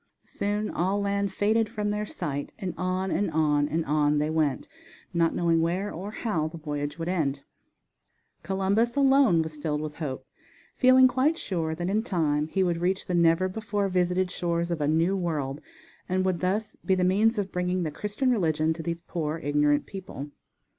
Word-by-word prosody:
Soon 205 +1 -2
all 190 +4 0
land 200 -1 0
faded 215 +3 +1
from 210 -1 -2
their 210 0 -2
sight, 145 -6 -4
and 185 -3 -4
on, 185 +1 -1
and 205 -2 +1
on, 150 -2 +2
and 165 +1 -1
on 150 0 +2
they 150 +1 0
went, 155 -4 0 0.5
not 165 -1 +2
knowing 165 -1 +2
where 180 +5 -1
or 190 +5 -6
how 210 -8 -2
the 165 +1 -8
voyage 145 -1 -4
would 165 0 -4
end. 145 -6 -1 1.0
Columbus 200 +5 +1
alone 270 - +4
was 155 -1 -7
filled 150 0 -2
with 150 -1 -6
hope, 145 -5 -4 0.5
feeling 255 0 +6
quite 265 +6 +1
sure 165 - -2
that 175 +2 -3
in 205 +3 +1
time 155 - 0
he 190 +4 0
would 170 -2 0
reach 185 +2 0
the 180 - -3
never 170 +1 +4
before 205 0 -2
visited 180 0 +1
shores 170 -1 -1
of 165 -3 -2
a 145 - +1
New 165 +5 +2
World, 150 -6 -2 0.5
and 185 0 +1
would 185 -2 0
thus 200 +5 -1
be 190 - +2
the 185 - +1
means 210 +5 +3
of 195 -2 -2
bringing 180 0 -1
the 155 - -2
Christian 210 - -1
religion 160 -7 +1
to 165 - -7
these 170 0 -4
poor, 160 -2 -3
ignorant 145 -1 +1
people. 180 -7 -8
175 Hz, 185 wpm, -27 LUFS, 155-200 Hz, 1.0 s, feeling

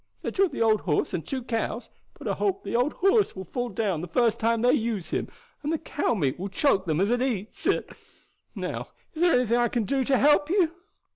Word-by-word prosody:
They - - -2
took 390 -3 +2
the 245 - 0
old 220 -1 +3
horse 150 -5 0
and 165 - -2
two 260 - -4
cows; 230 0 -3 0.3
but - - -8
I - - +1
hope 395 -1 -1
the - - -3
old 250 +5 +2
horse 395 +3 +2
will 190 0 -6
fall 245 +7 -3
down 195 -6 -1
the 175 - -5
first 230 +6 +1
time 230 0 +1
they 250 +1 +5
uses 225 - -1
him, - - -1 0.3
and 295 - -2
the 325 - +1
cow 290 -5 -1
meat 145 -8 -1
will 195 +2 -4
choke 195 -3 +1
them 160 -1 +1
as 200 +4 +2
eats 240 -4 -2
it. - - +1 0.7
Now, - - -4 0.3
is 315 - -6
there 350 -1 +5
anything 240 -1 +3
as - - +3
I 240 - +3
can 235 -1 -1
do 270 +5 0
to 270 0 +3
help 295 +2 +4
you?" 350 -3 +2
240 Hz, 235 wpm, -26 LUFS, 200-290 Hz, 0.7 s, they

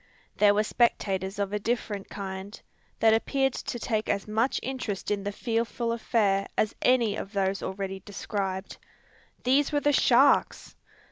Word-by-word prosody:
There 205 -1 +5
were 210 - +3
spectators 195 -4 0
of 200 0 -2
a 210 - 0
different 210 -3 -3
kind, 195 0 -6 0.4
that 220 0 +6
appeared 270 +4 +1
to - - -4
take 220 -2 -2
as 200 - -1
much 225 +5 +1
interest 245 -7 -4
in 205 -1 0
the 200 +1 -3
fearful 230 +1 -2
affair 205 -4 +1
as 215 - +1
any 235 -5 +3
of 200 -1 -6
those 195 -1 0
already 195 0 -4
described. 195 -1 -4 0.6
These 270 +4 +3
were 290 - +2
the 290 0 +2
sharks! - - +3
210 Hz, 150 wpm, -27 LUFS, 195-235 Hz, 0.6 s, that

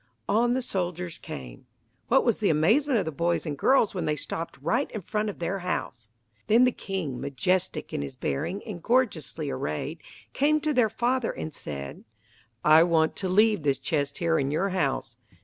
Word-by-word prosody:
On 240 +3 +3
the 260 - -1
soldiers 180 -5 -3
came. 65 - -9 0.4
What 265 +3 +4
was 235 -4 +2
the 210 - +2
amazement 230 - +3
of 195 - 0
the 160 - -2
boys 170 +4 0
and 150 -3 -3
girls 240 - +3
when 185 - -2
they 150 - +1
stopped 165 +3 -5
right 230 - 0
in 215 - -5
front 210 +4 -2
of 205 - -6
their 175 +3 -2
house! 120 -10 -4 0.4
Then 230 +3 +6
the 255 - +5
king, 180 - -4
majestic 180 +7 -1
in - - -1
his 70 -1 -6
bearing 180 - -3
and 195 -6 -7
gorgeously 230 - 0
arrayed, 75 - -3 0.3
came 300 +2 +3
to 305 0 0
their 245 -4 +3
father 245 +2 0
and 155 - -6
said, 70 - -6 0.6
"I 155 +1 +8
want 165 -2 +3
to 190 - -2
leave 210 0 +4
this 140 -2 +1
chest 145 -2 -1
here 165 -1 +1
in 135 -1 0
your 165 +7 0
house. 135 -10 -1
180 Hz, 185 wpm, -27 LUFS, 150-220 Hz, 0.6 s, I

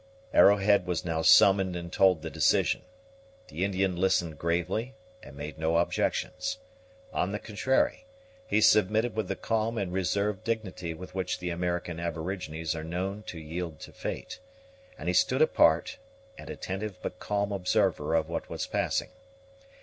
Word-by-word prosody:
Arrowhead 100 -2 +5
was 90 -2 -2
now 80 -2 -1
summoned 95 +1 +6
and 85 0 -6
told 90 -4 +4
the 80 - -4
decision. 80 -3 +2 0.7
The 80 +5 -3
Indian 95 -1 0
listened 85 -4 +1
gravely, 90 +9 -1 0.3
and 70 - -12
made 75 +2 -7
no 80 +1 +1
objections. 90 +2 -1 0.6
On 95 - 0
the 105 - -2
contrary, 130 - 0 0.4
he 110 - +2
submitted 110 +2 +4
with 110 -4 -1
the - - -2
calm 115 +1 -1
and 95 -4 -2
reserved 100 +2 0
dignity 100 -7 -3
with 90 +2 -10
which 95 -1 -2
the 90 -1 -4
American 85 -1 -2
aborigines 80 -1 -3
are 80 - -5
known 95 +5 -3
to 85 - -6
yield 80 0 -5
to - - -10
fate; - - -6 0.6
and 75 - -7
he 90 - +2
stood 90 - +4
apart, 85 - +3 0.4
an - - -11
attentive 95 +1 -5
but 90 - -5
calm 100 0 -1
observer 95 -5 +1
of 80 - +1
what - - -4
was - - -3
passing. - - -1
90 Hz, 155 wpm, -28 LUFS, 85-100 Hz, 0.7 s, summoned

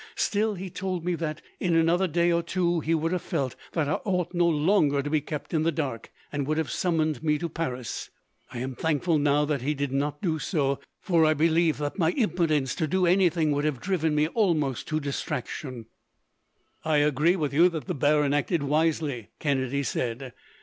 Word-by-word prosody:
Still, 210 0 0
he 185 0 -7
told 185 -3 -3
me 180 - +1
that, 160 -2 -4 0.2
in 175 -3 +1
another 170 +3 +3
day 170 +1 +2
or 170 0 +2
two, 175 0 0
he 165 +2 0
would 165 +1 -1
have 180 -2 -1
felt 130 -3 -2 0.2
that 160 -4 0
I - - -1
ought 180 -3 -1
no 175 -1 +3
longer 150 -3 +2
to 145 - -3
be 155 -1 +2
kept 150 +2 -6
in 160 - +2
the 165 +1 +2
dark, 140 -8 -4 0.2
and 145 -2 -2
would 155 +1 0
have 155 -6 -1
summoned 160 -4 0
me 150 -1 +1
to 170 - -3
Paris. 130 -7 -4 0.4
I - - -7
am 130 +2 -3
thankful 160 +3 +1
now 145 0 +3
that 145 -3 -1
he 150 +4 -1
did 140 -1 -2
not 145 +2 -1
do 160 -5 -1
so, 140 -5 0 0.2
for 170 -5 +3
I 155 0 +4
believe 165 +1 +2
that 145 +6 -4
my 160 -2 +3
impotence 165 - +1
to 160 -3 0
do 185 +4 +1
anything 170 -3 +3
would 145 0 0
have 150 -5 -1
driven 160 0 0
me 150 +1 +3
almost 160 - 0
to 155 -1 0
distraction." 140 -3 -4 1.0
"I 155 -1 +2
agree 150 +4 +3
with 150 -6 -2
you 170 +5 +6
that 160 -3 -5
the 180 - -2
baron 145 -1 +2
acted 145 +2 0
wisely," 150 -5 0
Kennedy 140 -1 0
said. 125 0 -3
155 Hz, 200 wpm, -26 LUFS, 145-170 Hz, 1.0 s, you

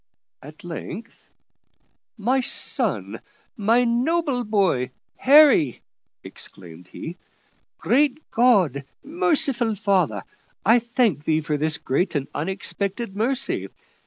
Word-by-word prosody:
At 155 +7 -13
length 180 +6 -8 0.9
"My 245 +5 +1
son! - - -2 0.3
my 230 +2 +3
noble 255 +3 0
boy 195 - +1 0.3
Harry," 270 - +5 0.4
exclaimed 85 -1 -10
he. 165 - -8 0.6
"Great 290 +3 +1
God! 195 - +3 0.2
Merciful 275 - 0
Father! 180 - 0 0.4
I 225 +3 +6
thank 235 - 0
Thee 160 0 +1
for 150 0 -2
this 155 +2 0
great 170 +7 -1
and 140 -2 -1
unexpected 195 +5 -3
mercy. 260 +5 -1
210 Hz, 100 wpm, -23 LUFS, 155-245 Hz, 0.9 s, I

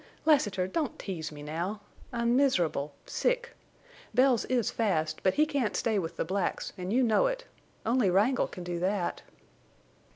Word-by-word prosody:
"Lassiter, 205 -12 +3
don't 290 - -2
tease 165 -6 -5
me 145 -1 -9
now. 170 +8 -3 0.3
I'm 235 0 +1
miserable—sick. 260 - 0 0.6
Bells 255 -1 +4
is 245 -4 +1
fast, 160 -8 0
but 190 - +2
he 305 - +4
can't 280 -8 -1
stay 220 -3 +1
with 170 -2 -4
the - - -1
blacks, 190 +2 -2
and 185 0 -4
you 255 +3 +3
know 230 - +4
it. - - -3 0.4
Only 230 -3 +3
Wrangle 210 +8 +3
can 180 - -8
do 175 -1 -3
that." 185 0 -1
210 Hz, 155 wpm, -29 LUFS, 175-255 Hz, 0.6 s, Bells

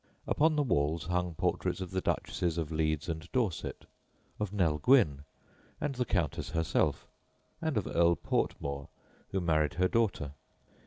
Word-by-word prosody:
Upon 155 +1 +3
the 150 - +3
walls 80 - +1
hung 90 0 -1
portraits - - 0
of 95 -2 -5
the 95 0 -1
Duchesses 85 -2 -1
of 80 -2 -2
Leeds 80 -1 0
and 80 0 -5
Dorset, 115 -10 -1 0.5
of 105 -2 -2
Nell 85 -7 +1
Gwyn 75 - +4 0.5
and 145 - -1
the 125 -1 -1
Countess 85 - -1
herself, 80 0 +1 0.6
and 160 -6 0
of 105 - 0
Earl 85 0 +3
Portmore, 70 -3 -2 0.4
who 95 - -1
married 80 -3 +1
her 90 +1 +3
daughter. 95 -11 0
85 Hz, 150 wpm, -31 LUFS, 80-105 Hz, 0.6 s, Gwyn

